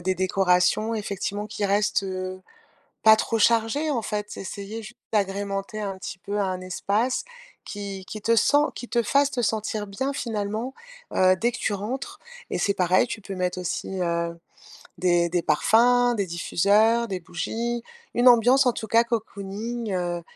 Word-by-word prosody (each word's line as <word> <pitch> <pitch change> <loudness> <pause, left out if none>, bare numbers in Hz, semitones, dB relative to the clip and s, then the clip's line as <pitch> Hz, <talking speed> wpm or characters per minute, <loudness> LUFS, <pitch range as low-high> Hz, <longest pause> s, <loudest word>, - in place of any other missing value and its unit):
des 185 +1 0
décorations 190 +3 +2
effectivement 205 0 -3
qui 210 -1 -2
restent, 200 +1 +2
heu, 185 0 -4 0.6
pas 220 0 +9
trop 225 +1 -1
chargées, 230 +8 +2
en 245 -5 0
fait. 210 -1 -4
Essayer 200 +3 -6
ju 230 +3 -10 0.2
d'agrémenter 200 0 -1
un 200 -2 -3
petit - - -6
peu 205 +3 -4
à 200 - +1
un 185 -1 -2
espace 205 +7 -1 0.4
qui 200 -2 -6
qui 215 - -6
te 230 +2 +3
sent, 230 +6 +4 0.2
qui 245 - -8
te 235 -1 +1
fasse 280 +5 +3
te 255 -3 -2
sentir 215 -1 -1
bien 235 +8 -3
finalement, 225 0 -3 0.4
heu, 185 0 +5
dès 240 +1 +2
que 250 - -6
tu 210 - -1
rentres 260 - -5 0.3
et - - -2
c'est 200 - +1
pareil, 185 +3 +3
tu 230 -2 -6
peux 195 0 -7
mettre 180 0 -2
aussi, 185 +1 -3
heu, 170 -1 -1 0.6
des 175 -1 +2
des 175 0 0
parfums, 245 +9 +4
des 200 - 0
diffuseurs, 205 +7 +2
des 190 -3 -4
bougies, 230 +8 -3 0.3
une 245 +1 +3
ambiance 245 +3 +6
en 245 - +3
tout 220 - -6
cas 230 +2 +4
cocooning, 220 0 -4
heu, 175 -1 -2
205 Hz, 170 wpm, -25 LUFS, 190-230 Hz, 0.6 s, pas